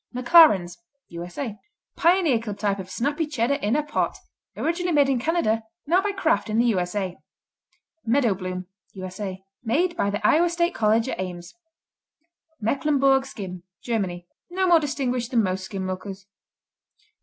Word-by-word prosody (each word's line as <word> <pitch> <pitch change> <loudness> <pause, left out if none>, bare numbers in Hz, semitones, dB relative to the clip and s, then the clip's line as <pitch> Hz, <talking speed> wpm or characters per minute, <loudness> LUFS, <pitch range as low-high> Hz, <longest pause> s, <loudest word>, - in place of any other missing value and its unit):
McLaren's 240 - +5 0.3
U.S.A. 180 +7 -6 0.4
Pioneer 340 -7 +3
club 210 -3 -6
type 200 -1 -1
of 190 -1 -7
snappy 290 - -1
Cheddar 280 0 0
in 210 +5 +1
a 300 - +1
pot, 295 - -1 0.4
originally 345 +1 -1
made 285 -2 +4
in 265 -3 +1
Canada, 240 -6 +1 0.2
now 350 +5 +3
by 410 +1 -1
Kraft 330 - 0
in 215 - 0
the 235 - +4
U.S.A. 185 -2 -2 0.9
Meadowbloom 190 -8 0 0.3
U.S.A. 190 0 -6 0.2
Made 330 +10 +1
by 200 - 0
the 205 +1 -3
Iowa 340 +9 +4
State 345 +1 0
College 220 +2 +2
at - - -4
Ames. 175 -1 -6 1.1
Mecklenburg 270 +3 +2
Skim 185 -7 -7 0.2
Germany 190 -7 -2 0.2
No 375 +2 0
more 345 -2 +6
distinguished 255 -5 -2
than 235 -4 +2
most 185 0 -2
skim 190 -1 -5
milkers. 190 +1 -6
230 Hz, 145 wpm, -24 LUFS, 190-300 Hz, 1.1 s, more